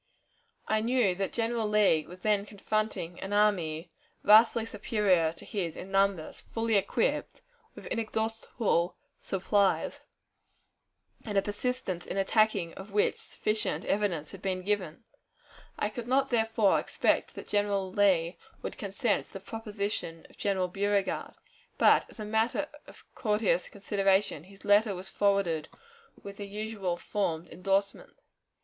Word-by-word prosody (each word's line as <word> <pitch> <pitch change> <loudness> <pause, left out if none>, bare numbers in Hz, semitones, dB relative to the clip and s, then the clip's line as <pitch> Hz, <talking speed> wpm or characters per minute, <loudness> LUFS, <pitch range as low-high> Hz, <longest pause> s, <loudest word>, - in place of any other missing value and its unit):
I 215 0 +2
knew 235 -4 +2
that 195 +2 -2
General 230 -1 0
Lee 205 -7 +3
was 180 +1 -12
then 210 -2 +2
confronting 210 -4 -2
an 195 +1 -5
army 175 -6 +1 0.3
vastly 220 +2 +6
superior 200 -6 +1
to - - -13
his 175 -6 -3
in 190 - -8
numbers, 195 -4 +1
fully 225 0 0
equipped, 340 - 0 0.3
with - - -11
inexhaustible 220 -5 -1 0.2
supplies, 195 +1 +1 1.2
and 210 -3 -3
a - - +5
persistence 205 -4 -3
in - - -4
attacking 195 -3 +2
of 190 +2 -10
which 205 +1 +2
sufficient 215 0 -2
evidence 185 -7 0
had 195 - -10
been 185 -1 -2
given. 195 -2 -2 0.7
I 210 - 0
could 230 +2 -7
not 270 +2 +2
therefore 225 -3 +3
expect - - 0
that - - -8
General 200 -2 0
Lee 180 -4 +2 0.2
would - - -5
consent 200 +2 0
to - - -21
the 195 - -6
proposition 205 -5 -4
of - - -21
General 190 -2 +1
Beauregard; 200 +1 -1 0.4
but, - - +5
as - - -14
a 215 - -4
matter 220 +7 +1 0.2
of - - -15
courteous 210 -4 +1
consideration, 195 -5 +1
his 195 +1 -16
letter 205 0 +4
was 185 +1 -8
forwarded 195 -7 +1 0.5
with 200 0 -8
the 205 - -6
usual 205 -3 -3
formed 175 -4 -2
endorsement. 195 - -1
200 Hz, 135 wpm, -29 LUFS, 185-215 Hz, 1.2 s, vastly